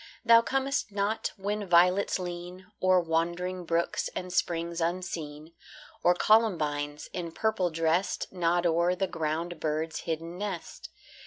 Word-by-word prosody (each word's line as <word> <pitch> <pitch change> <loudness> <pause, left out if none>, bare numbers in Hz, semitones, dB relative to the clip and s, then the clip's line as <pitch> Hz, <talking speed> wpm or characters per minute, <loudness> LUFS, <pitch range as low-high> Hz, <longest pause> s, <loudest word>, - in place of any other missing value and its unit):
Thou 230 0 +8
comest 270 0 -1
not 200 +2 -1
when 205 +1 -3
violets 180 +3 +4
lean 180 0 -7 0.2
O'er 185 0 +5
wandering 175 +2 -1
brooks 170 +1 0
and 180 -1 -5
springs 170 -1 -1
unseen, 165 -3 -4 0.5
Or 175 - +4
columbines, 150 -9 +2
in 170 -2 -4
purple 220 -1 0
dressed, 165 +5 0
Nod 175 -1 +1
o'er 170 +2 +2
the 195 +1 0
ground 165 0 -3
bird's 155 +1 -2
hidden 165 +2 -4
nest. 200 -5 -5
175 Hz, 130 wpm, -29 LUFS, 165-185 Hz, 0.5 s, Thou